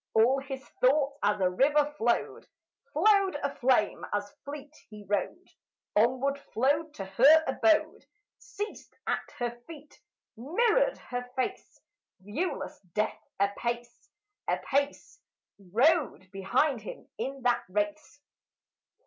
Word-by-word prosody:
All 240 +5 +5
his 270 0 -7
thoughts 280 +2 +3
as 205 0 +2
a 185 - +3
river 290 +8 +3
flowed, 235 +1 0 0.4
Flowed 390 +4 +4
aflame 260 -5 +1
as 205 0 -2
fleet 290 +1 -8 0.2
he 210 -1 -11
rode, 205 - -2 0.5
Onward 260 +5 +2
flowed 290 +6 +1
to 195 - -5
her 275 +12 +6
abode, 325 -1 +2 0.4
Ceased 400 +9 -7
at - - 0 0.2
her 240 -1 -1 0.2
feet, 300 -3 -13 0.3
mirrored 465 - +2
her 245 0 -6
face. 260 - -3 0.4
(Viewless 215 - -4
Death 215 +1 -1 0.2
apace, 235 +4 -2 0.4
apace, 280 +1 -1 0.4
Rode 225 - +1
behind 220 +7 +1
him 210 - -9
in 270 -1 -4
that 245 -1 +3
race.) 290 +9 -3
265 Hz, 110 wpm, -29 LUFS, 220-300 Hz, 0.5 s, her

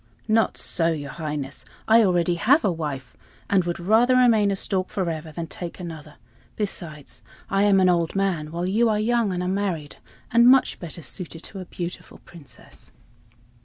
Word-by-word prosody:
"Not 220 0 +2
so, 165 -2 0
your 145 -3 -5
Highness, 150 -3 -5 0.2
I 225 +1 +6
already 175 -3 +2
have 260 - +3
a 195 - +3
wife, 145 -6 -5 0.4
and 190 -3 +3
would 175 0 -3
rather 225 +8 +3
remain 230 -5 +4
a 200 - 0
stork 185 -1 -2
forever 165 -5 -3
than 165 +2 -5
take 170 +2 -8
another; 160 -4 -8 0.4
besides, 165 -8 -5 0.3
I 195 +1 +3
am 200 -2 +5
an 185 - +4
old 170 -1 +1
man, 185 -6 0
while 170 +2 -3
you 220 +5 +2
are 210 -1 +1
young 230 -1 +1
and 180 0 -2
unmarried, 180 -5 -2 0.3
and 235 +1 +6
much 260 +1 +4
better 170 -1 -8
suited 170 -2 -7
to 195 - -9
a 185 - -7
beautiful 175 0 -7
Princess." 165 -5 -13
180 Hz, 170 wpm, -24 LUFS, 165-205 Hz, 0.4 s, I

